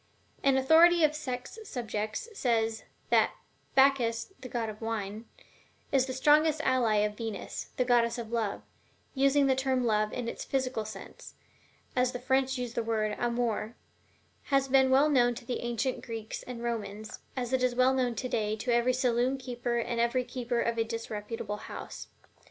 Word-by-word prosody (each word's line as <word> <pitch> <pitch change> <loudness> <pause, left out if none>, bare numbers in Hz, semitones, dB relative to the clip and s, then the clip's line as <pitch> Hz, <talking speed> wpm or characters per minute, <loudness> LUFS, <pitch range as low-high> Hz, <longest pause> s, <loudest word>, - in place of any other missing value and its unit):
An 275 -1 +3
authority 325 +5 +6
of 300 -1 +4
sex 265 - -5
subjects 220 - -4
says: 225 - 0 0.3
"That - - +4 0.4
Bacchus, 265 +1 +3
the 255 - -8
god 235 -2 -2
of 215 0 -8
wine, 220 -1 -4 0.7
is 270 -1 +3
the 260 - -3
strongest 300 +4 +4
ally 255 -6 +2
of 210 0 -3
Venus, 225 -2 -5
the 250 - +2
goddess 235 -1 +3
of 230 -2 -6
love, 225 -4 -1 0.5
using 275 +1 +3
the 265 -1 +3
term 260 -1 +1
Love 215 -1 +2
in 245 -2 -4
its - - -4
physical 255 -5 -1
sense, 215 - -10 0.6
as 250 0 +2
the 250 - -4
French 265 +1 +1
use 245 -2 -4
the 235 - 0
word 220 -2 -1
'amour,' 235 -2 -1 0.7
has 275 -1 +2
been 265 0 +4
well 270 +3 +5
known 245 -5 +3
to 245 0 -9
the 245 - -2
ancient 240 +2 -2
Greeks 225 -2 -6
and 240 -2 -7
Romans, 215 -2 -4 0.2
as 250 0 -2
it 260 - +2
is 250 -1 +1
well 255 +1 +4
known 250 -2 0
today 215 -3 -1
to 235 +3 -1
every 240 +2 +3
saloon 250 +1 +1
keeper 245 -2 -3
and 235 0 -1
every 240 +2 +1
keeper 245 -1 -2
of 235 0 -1
a - - +4
disreputable 225 -1 -5
house. - - -8
245 Hz, 170 wpm, -30 LUFS, 225-260 Hz, 0.7 s, authority